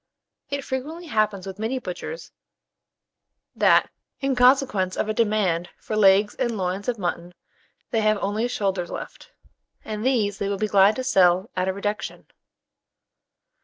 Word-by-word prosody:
It 280 -1 -3
frequently 305 +7 -5
happens 215 - 0
with 195 +1 -8
many 225 +4 -1
butchers, 250 - -7 1.2
that, - - +4 0.3
in 270 -1 0
consequence 250 -7 +3
of - - 0
a 215 - 0
demand 205 -6 +1
for 215 - -5
legs 205 0 +5
and 240 -4 -1
loins 190 +1 -3
of 245 -2 0
mutton, 175 -2 -4 0.6
they 225 - +1
have 215 0 +3
only 205 +4 -1
shoulders 195 -6 -2
left, - - -8 0.6
and 215 -1 -4
these 220 -6 +1
they 200 - -1
will 200 - -1
be 215 +2 -1
glad 200 +1 +5
to 260 - -3
sell 185 -5 +3
at 185 0 0
a 190 - 0
reduction. 205 +2 -4
210 Hz, 150 wpm, -24 LUFS, 190-240 Hz, 1.2 s, legs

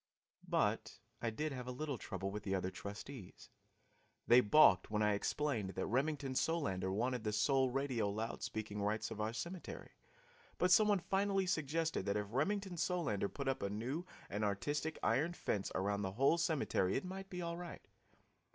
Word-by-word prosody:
But - - 0 0.2
I 115 - 0
did 150 +7 -2
have 125 -2 -5
a - - -2
little 140 -1 -3
trouble 95 0 -4
with 105 +1 -4
the 95 -1 -1
other 95 0 -1
trustees. 105 +2 -8 0.7
They 125 +1 +7
balked 105 -6 +6
when 105 0 +1
I 105 0 +4
explained 110 -2 -1
that - - -1
Remington 135 +3 0
Solander 100 - 0
wanted 120 +4 0
the 105 - 0
sole 130 +5 +3
radio 125 -5 0
loud 110 +3 -3
speaking 105 -1 -4
rights 105 +2 -1
of 110 -1 -4
our 110 +1 0
cemetery, 170 +10 -6 0.7
but 180 +1 +2
some 210 +3 +7
one 205 -1 +4
finally 195 0 +1
suggested 160 - 0
that 100 +1 +1
if 105 - -1
Remington 190 - 0
Solander 160 - 0
put 140 -1 -5
up 135 - 0
a 100 - -1
new 120 - -3 0.2
and 105 +2 -2
artistic 145 +10 -1
iron 145 +9 +2
fence 100 - -2
around 100 +2 0
the 95 -1 -2
whole 135 +9 +3
cemetery 140 - +1
it 135 - -1
might 190 +1 -6
be 180 -2 -4
all 170 0 -3
right. 175 -1 -8
125 Hz, 180 wpm, -37 LUFS, 105-160 Hz, 0.7 s, They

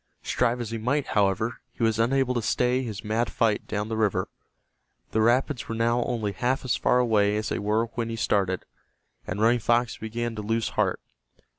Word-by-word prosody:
Strive 125 0 +1
as 115 -2 -4
he 115 - -3
might, 130 +6 0
however, 105 +3 +1
he - - -4
was 110 -1 +2
unable 130 +2 +2
to 120 - 0
stay 125 +3 +1
his 110 -4 -5
mad 110 +2 0
flight 110 -2 +1
down 105 0 -2
the 110 - -3
river. 110 -3 0 0.8
The 110 - +1
rapids 125 +3 +1
were 115 - -2
now 115 +1 +2
only 110 -4 -1
half 125 +7 -1
as 125 - +1
far 125 - +2
away 105 -4 +3
as 110 - -2
they - - -1
were 105 +3 +1
when 115 -1 -2
he 115 - -3
started, 95 -5 0 0.6
and - - -3
Running 115 +3 +4
Fox 120 +1 +1
began 115 +1 -3
to - - -3
lose 115 +2 -1
heart. - - 0
115 Hz, 195 wpm, -26 LUFS, 110-120 Hz, 0.8 s, Running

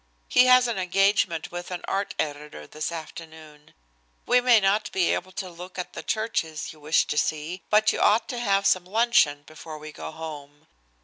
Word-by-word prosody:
He 250 - +5
has 255 0 +6
an 230 -5 -2
engagement 185 -2 +1
with 175 0 -6
an 180 -1 -6
art 195 +1 -2
editor 145 - -5
this 155 - -5
afternoon. 160 -2 -10 0.5
We 250 0 +4
may 245 -2 +5
not 205 +2 +1
be 185 -2 +1
able 185 +1 -4
to 190 - -5
look 180 +1 -11
at 180 - -5
the - - -6
churches 165 -10 -3
you 155 - -19
wished 150 +2 +1
to 150 - +1
see, 155 +4 -3
but 215 +1 +4
you - - -3
ought 220 +2 +3
to 245 - -4
have 200 -4 +1
some 185 -1 +3
luncheon 190 -9 +2
before 155 +1 -10
we 155 0 -10
go - - -8
home. 145 -2 -9
175 Hz, 190 wpm, -25 LUFS, 155-205 Hz, 0.5 s, has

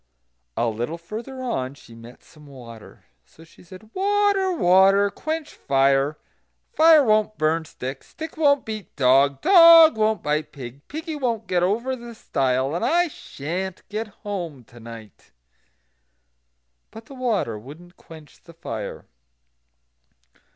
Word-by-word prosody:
A 120 - +1
little 120 +9 -4
further 230 +9 -8
on 135 - -3
she 115 - -17
met 115 +1 -14
some 150 -2 -18
water. 120 -5 -13 0.2
So 160 - -19
she 165 - -20
said: 185 +5 -15
"Water! 400 -1 +1
water! 195 - +4
quench 315 +4 -5
fire; 135 +2 +1 0.6
fire 320 -4 +6
won't 215 -2 +1
burn 160 +1 0
stick; 135 -2 -7
stick 320 0 -9
won't 285 -3 +2
beat 215 -4 -7
dog; 135 +1 +3
dog 335 - +8
won't 215 0 0
bite 150 +1 -2
pig; 135 0 -11
piggy 315 +2 -6
won't 240 -6 -2
get 180 -1 0
over 230 +8 0
the 235 -1 -11
stile; 135 -6 -1
and 170 - -3
I 340 +7 +2
sha'n't 180 - -6
get 215 +2 -4 0.2
home 170 -10 -5
to 120 +1 -17
night." 115 -3 -13 1.6
But 225 0 -12
the 275 - -13
water 220 - -2
wouldn't 160 - -14
quench 160 -2 -16
the 170 - -17
fire. 110 -10 -7
185 Hz, 135 wpm, -23 LUFS, -, 1.6 s, dog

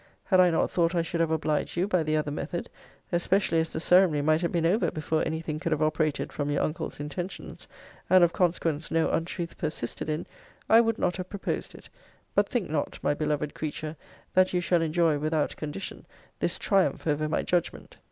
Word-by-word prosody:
Had 185 -3 +3
I 180 -1 +7
not 165 - +1
thought 170 0 +1
I 170 - +2
should 165 0 -2
have 165 - +2
obliged 155 0 -1
you 180 +3 +2
by 185 -4 +2
the 155 0 +1
other 150 -1 -1
method, 160 +4 -4 0.4
(especially 175 0 +2
as 160 0 0
the - - -4
ceremony 175 -4 +4
might 155 +2 +3
have 170 - 0
been 170 -1 0
over 190 +7 +2
before 155 0 -1
any 160 0 -2
thing 155 -2 -4
could 165 - -3
have 155 0 +1
operated 155 -1 0
from 145 -1 -2
your 145 - +1
uncle's 155 -1 -3
intentions, 175 +6 -6 0.4
and 185 -1 +7
of 170 - +3
consequence 165 -3 0
no 165 0 +1
untruth 170 +1 -3
persisted 155 -3 -3
in,) 155 0 -2 0.4
I 225 +1 +7
would 225 -1 0
not 180 -4 0
have 185 -1 -5
proposed 200 - -4
it. - - -13 0.5
But - - +2
think 240 -8 -1
not, 150 -1 -2
my - - +2
beloved 150 0 -1
creature, 155 0 -4 0.4
that 185 0 +4
you 180 - +2
shall 175 -1 +2
enjoy, 160 -2 +2
without 155 0 0
condition, 155 +5 -6 0.3
this - - 0
triumph 195 -3 +1
over 155 0 0
my 155 - 0
judgment. 175 -2 -2
165 Hz, 200 wpm, -27 LUFS, 155-180 Hz, 0.5 s, I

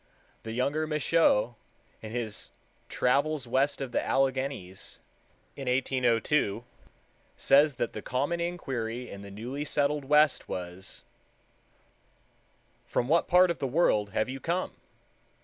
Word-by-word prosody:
The 110 - -6
younger 140 +6 0
Michaux, 150 -6 +2 0.5
in 110 - -7
his 115 -3 -3 0.4
Travels 140 +2 +1
West 135 +4 +1
of 135 -2 -4
the - - 0
Alleghanies 130 -8 -1 0.6
in 135 -2 -7
1802, 125 -2 +1 0.7
says 145 0 +5
that 120 - -2
the 110 - -5
common 145 +10 -1
inquiry 125 -9 -3
in 100 - -8
the 100 - -9
newly 120 +8 -5
settled 145 -1 0
West 150 0 +3
was, 90 +1 -6 1.8
"'From 120 - -1
what 170 +2 +3
part 180 0 +5
of 165 - -5
the 135 - -1
world 120 -8 +2
have 110 +3 0
you 130 +1 -5
come? 175 +5 -2
135 Hz, 125 wpm, -29 LUFS, 115-150 Hz, 1.8 s, says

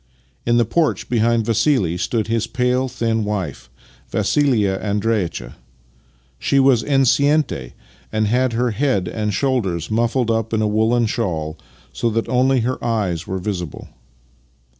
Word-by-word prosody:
In 120 0 +3
the 120 - +3
porch 160 +7 0
behind 115 -1 +2
Vassili 115 - +2
stood 110 +4 -1
his 115 0 -1
pale, 125 +1 0
thin 115 -3 -1
wife, 85 -12 -4 0.4
Vassilia 110 -10 +1
Andreitcha. 100 - -2 0.8
She 140 - +2
was 135 -4 +4
enceinte, 140 - +2 0.4
and 110 0 +1
had 125 +3 +1
her 120 +1 +1
head 105 -6 0
and 105 +3 -2
shoulders 100 - -1
muffled 120 +1 +1
up 115 0 -1
in 110 - +1
a - - +2
woollen 110 +3 +2
shawl, 85 -10 -2 0.4
so 120 - 0
that 115 0 -1
only 130 0 +3
her 125 +3 -2
eyes 100 -8 -1
were 95 - -2
visible. 90 -5 -5
115 Hz, 140 wpm, -20 LUFS, 100-125 Hz, 0.8 s, was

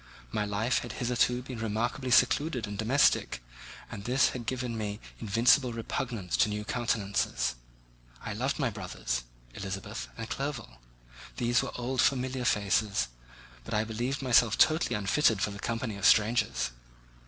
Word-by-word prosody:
My 105 - -1
life 105 +4 0
had 120 -2 -7
hitherto 125 0 +1
been 130 -3 -7
remarkably 115 +4 -2
secluded 125 +1 +3
and 105 -1 -6
domestic, 110 - +2 0.5
and 100 - -7
this 125 +3 +3
had 120 -3 -6
given 125 -2 -2
me 105 -1 -3 0.2
invincible 120 +4 +3
repugnance 115 -3 -3
to - - +4
new 105 0 -3
countenances. 110 - 0 0.7
I - - -5
loved - - -1
my - - 0
brothers, - - -4 0.3
Elizabeth, 95 - -5
and 115 -1 -5
Clerval; 135 - -5 0.6
these 120 0 +2
were - - -4
"old 125 +1 0
familiar 130 -1 +1
faces," 100 - +1 0.5
but 65 - -4
I 105 - +2
believed 120 +5 -3
myself 120 -3 +4
totally 155 +2 +3
unfitted 105 +2 +2
for 100 - 0
the 100 - -8
company 115 -2 -3
of 100 - -3
strangers. 110 - +3
115 Hz, 145 wpm, -29 LUFS, 105-125 Hz, 0.7 s, to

